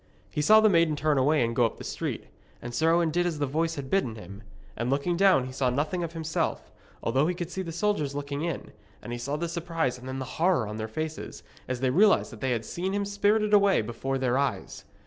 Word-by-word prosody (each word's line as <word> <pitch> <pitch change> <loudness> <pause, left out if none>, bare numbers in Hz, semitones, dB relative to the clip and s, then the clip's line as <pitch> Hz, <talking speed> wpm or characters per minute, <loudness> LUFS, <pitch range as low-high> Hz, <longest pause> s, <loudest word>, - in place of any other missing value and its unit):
He 150 - -1
saw 215 +8 +7
the 220 - +6
maiden 165 -5 +3
turn 150 -1 +1
away 145 +1 +3
and 115 0 -3
go 120 - +3
up 115 - 0
the - - -9
street, - - -4 0.3
and 120 0 -7
Sir 160 +5 +2
Owen 170 -1 +2
did 175 +2 +1
as 165 -3 -2
the 145 - 0
voice 160 +4 -1
had 135 -2 -7
bidden 160 - +1
him. 100 -1 -10 0.3
And 120 +2 -2
looking 145 +6 0
down 185 -8 +4
he 130 - -7
saw 130 0 0
nothing 150 +7 -1
of 165 -1 -5
himself, 160 -1 -2 0.3
although 135 +6 +2
he 180 - -1
could 175 0 -5
see 190 - -3
the 170 -3 -5
soldiers 165 -6 -1
looking 145 0 -4
in, 170 0 -4 0.3
and 120 - -7
he 120 - -4
saw 140 +4 -3
the 170 +3 -2
surprise 165 -6 -2
and 125 - -10
then 130 0 -4
the 130 - -4 0.2
horror 170 -9 +3
on 105 +1 -5
their 110 0 -3
faces, 155 +7 -5 0.2
as 130 -1 -3
they 130 -1 +2
realised 200 +4 +4
that 115 - -11
they 130 - 0
had 115 -3 -1
seen 185 +3 -3
him 200 0 0
spirited 205 +1 +1
away 200 - +5
before 125 +4 -3
their 130 0 +1
eyes. 140 -1 -3
150 Hz, 245 wpm, -27 LUFS, 130-175 Hz, 0.3 s, saw